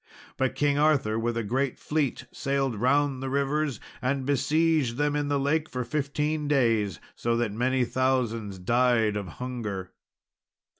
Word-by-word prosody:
But 130 0 0
King 145 +1 +2
Arthur 140 -8 +2
with 115 +1 -1
a 115 - 0
great 130 +5 -1
fleet 145 -4 -1
sailed 135 -3 -1
round 135 +4 +2
the 135 - -3
rivers 140 +1 0 0.2
and 130 +1 0
besieged 150 -1 +2
them 145 0 +1
in 145 -1 0
the 145 -1 +1
lake 155 +3 0
for 125 -1 -3
fifteen 150 +3 -1
days, 115 - +2
so 115 0 -1
that 120 -3 0
many 125 +3 +1
thousands 120 -6 0
died 115 +2 +2
of 100 -2 -3
hunger. 110 -7 -4
130 Hz, 150 wpm, -27 LUFS, 115-145 Hz, 0.2 s, King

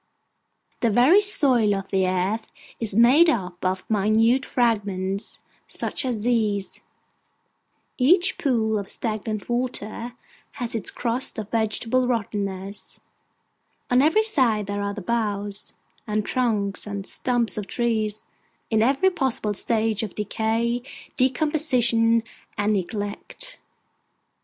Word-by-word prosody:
The 235 - +2
very 255 - +5
soil 255 - +2
of 195 0 -5
the 190 -2 +2
earth 190 +5 -1 0.3
is 215 -4 0
made 260 +9 +6
up 180 - -2
of 185 0 -1
minute 220 +5 +2
fragments 200 -5 -1 0.3
such 290 - -3
as 240 -5 -2
these; 215 -4 -1 1.2
each 350 +8 +3
pool 220 -6 +1
of 200 - -7
stagnant 215 -2 -4
water 240 -1 -3 0.4
has 245 -5 -4
its 225 -5 +2
crust 245 +2 -1
of 215 -2 -6
vegetable 230 +3 0
rottenness; 200 -4 -4 0.9
on 250 +1 +5
every 320 +10 +4
side 250 - +2
there 205 +1 -3
are 200 0 -3
the 205 - -6
boughs, 205 -1 -2 0.3
and 210 -1 -1
trunks, 215 -6 -1
and 200 -1 -5
stumps 240 -1 +1
of 205 -2 -4
trees, 220 -3 -1 0.5
in 220 -1 +3
every 275 +11 +3
possible 260 - -1
stage 220 0 0
of 215 -4 -5
decay, 225 +3 -1 0.3
decomposition, 250 -4 +2 0.3
and 210 +1 +1
neglect. 205 - -5
225 Hz, 120 wpm, -24 LUFS, 205-250 Hz, 1.2 s, made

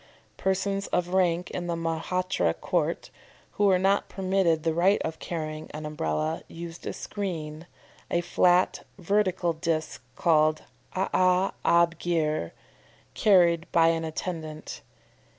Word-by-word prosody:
Persons 195 +1 -1
of 175 0 0
rank 180 -1 +1
in 175 -1 -4
the 170 - -1
Mahratta 165 - -1
court, - - -1 0.4
who 205 - +1
were 190 -2 +5
not 195 +2 +1
permitted 185 -4 +1
the 165 - +1
right 185 +5 +3
of 160 0 -4
carrying 155 -2 -5
an 155 0 -6
Umbrella, 150 - -2
used 170 0 -8
a - - -1
screen, 165 -5 -5 0.4
a 175 - +1
flat 175 +1 +2
vertical 185 -2 +1
disc 160 -3 -2
called 155 -1 +3 0.3
AA' 185 0 +2
ab 170 -1 +3
gir, 155 - 0 0.6
carried 175 -4 +3
by 165 -1 +5
an 165 0 0
attendant. 160 -1 -5
170 Hz, 125 wpm, -27 LUFS, 160-185 Hz, 0.6 s, were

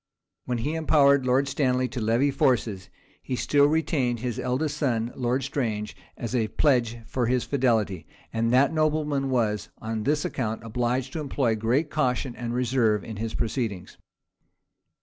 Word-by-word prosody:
When 125 -1 -1
he 140 +7 -2
empowered 140 -4 +4
Lord 130 +2 +3
Stanley 130 -2 +1
to 125 - -5
levy 115 +6 +2
forces, 115 -8 0 0.3
he 130 - -3
still 145 +3 +3
retained 145 -6 +1
his 120 0 -3
eldest 140 +4 -1
son, 120 -5 0
Lord 125 +1 0
Strange, 110 -6 -2 0.2
as 120 0 -5
a 115 -3 +1
pledge 120 -4 +1
for 125 -1 -1
his 125 0 +1
fidelity; 115 - 0 0.3
and 115 +1 +1
that 135 +5 +4
nobleman 150 -3 0
was, 110 -5 0
on 110 0 -3
this 150 +5 0
account, 110 -4 -3
obliged 125 +3 -1
to - - -3
employ 135 -5 0
great 125 +8 0
caution 130 -3 0
and 120 -1 -4
reserve 120 -4 +1
in 110 -2 -7
his 110 +1 -4
proceedings. 110 -5 -3
125 Hz, 155 wpm, -26 LUFS, 115-140 Hz, 0.3 s, empowered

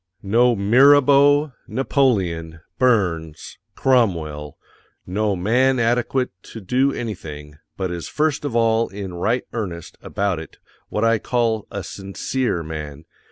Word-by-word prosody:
No 120 +4 +3
MIRABEAU, 140 +6 +5 0.2
NAPOLEON, 95 - 0 0.2
BURNS, 90 -11 0 0.2
CROMWELL, 80 - 0 0.5
NO 100 +2 -1
man 125 +8 +2
ADEQUATE 120 +2 0
to 115 - -10
DO 125 +7 +1
ANYTHING 75 -9 -7 0.2
but 95 -2 -2
is 85 -1 -5
first 150 -2 -1
of 140 -5 -3
all 115 0 +2
in 95 -2 -7
RIGHT 110 +8 -1
EARNEST 90 -8 -6
about 100 -4 -2
it 80 - -11 0.3
what 105 +2 0
I 115 -1 +3
call 115 -3 -1
A 100 - -5
SINCERE 100 +2 -3
_man. 75 -2 -7
110 Hz, 120 wpm, -21 LUFS, 85-125 Hz, 0.5 s, MIRABEAU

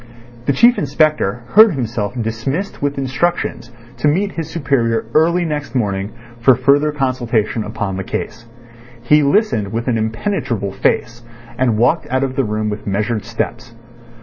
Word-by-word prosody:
The 140 - +3
Chief 240 - +5
Inspector 145 -6 +1
heard 215 -1 +7
himself 120 -2 -3
dismissed 120 - -3
with 145 0 -1
instructions 135 -2 -2 0.3
to - - +1
meet 195 +7 +1
his 165 -2 -5
superior 125 -9 0
early 170 +3 +3
next 150 -3 -4
morning 100 -4 -1 0.3
for 125 +2 +5
further 140 +4 +3
consultation 120 -6 -1
upon 105 -3 -4
the 95 - -3
case. 115 +4 -5 0.6
He 150 +5 +5
listened 140 - +1
with 115 +2 -3
an 115 -3 +1
impenetrable 110 - -2
face, 120 +4 -1 0.3
and 120 -3 +1
walked 125 +9 +2
out 130 +1 +1
of 130 -1 -2
the 135 - +1
room 105 -1 -2
with 105 0 -5
measured 105 +2 -1
steps. 115 0 -4
125 Hz, 150 wpm, -18 LUFS, 110-150 Hz, 0.6 s, heard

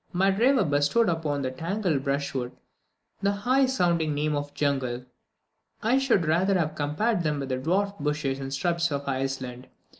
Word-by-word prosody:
My 190 +2 +3
driver 240 +4 +3
bestowed 145 +8 +2
upon 150 -4 -1
this 130 0 -3
tangled 170 -5 -1
brushwood 140 -3 -2 0.7
the 200 - +2
high 255 +7 +2
sounding 170 - +1
name 150 +1 0
of 145 0 -3
jungle. 130 -4 -1 0.8
I 245 +5 +3
should 235 -10 +2
rather 185 +5 +2
have 160 -3 0
compared 155 +8 0
them 150 -3 -1
with 135 -1 -4
the 130 - 0
dwarfed 195 +8 0
bushes 145 -2 -1
and 135 0 -5
shrubs 170 +3 0
of 140 0 -3
Iceland. 130 -2 -3
155 Hz, 160 wpm, -26 LUFS, 140-195 Hz, 0.8 s, My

